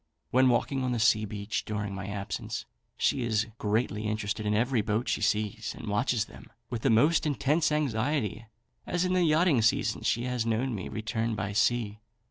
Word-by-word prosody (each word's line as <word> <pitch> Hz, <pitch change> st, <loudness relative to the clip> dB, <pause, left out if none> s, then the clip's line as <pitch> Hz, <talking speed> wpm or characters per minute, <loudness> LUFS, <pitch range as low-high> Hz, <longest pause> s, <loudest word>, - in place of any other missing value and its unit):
When 130 Hz, +1 st, +5 dB
walking 130 Hz, +2 st, +1 dB
on 125 Hz, -1 st, 0 dB
the 120 Hz, -, -1 dB
sea 110 Hz, -1 st, +4 dB
beach 105 Hz, 0 st, -3 dB
during 105 Hz, -2 st, -3 dB
my 95 Hz, -1 st, -5 dB
absence, 100 Hz, -1 st, -4 dB, 0.3 s
she 135 Hz, -, +1 dB
is 110 Hz, -2 st, +1 dB
greatly 105 Hz, 0 st, 0 dB
interested 105 Hz, 0 st, -2 dB
in 105 Hz, -, +2 dB
every 120 Hz, +1 st, +2 dB
boat 105 Hz, +3 st, -1 dB
she -, -, 0 dB
sees, 105 Hz, -1 st, -1 dB
and -, -, -8 dB
watches 105 Hz, +1 st, +1 dB
them -, -, -14 dB, 0.2 s
with 120 Hz, -2 st, -3 dB
the 135 Hz, -, +2 dB
most 150 Hz, +9 st, +4 dB
intense 150 Hz, +2 st, +1 dB
anxiety, 125 Hz, -5 st, -1 dB, 0.4 s
as 175 Hz, +1 st, 0 dB
in 180 Hz, -, 0 dB
the 185 Hz, -, +3 dB
yachting 155 Hz, -4 st, +4 dB
season 110 Hz, 0 st, +1 dB
she 120 Hz, -, 0 dB
has 125 Hz, -2 st, -1 dB
known 115 Hz, +3 st, 0 dB
me 95 Hz, -4 st, -5 dB
return 110 Hz, +1 st, -2 dB
by 100 Hz, -1 st, -3 dB
sea. 110 Hz, -1 st, +1 dB
115 Hz, 185 wpm, -29 LUFS, 105-130 Hz, 0.4 s, When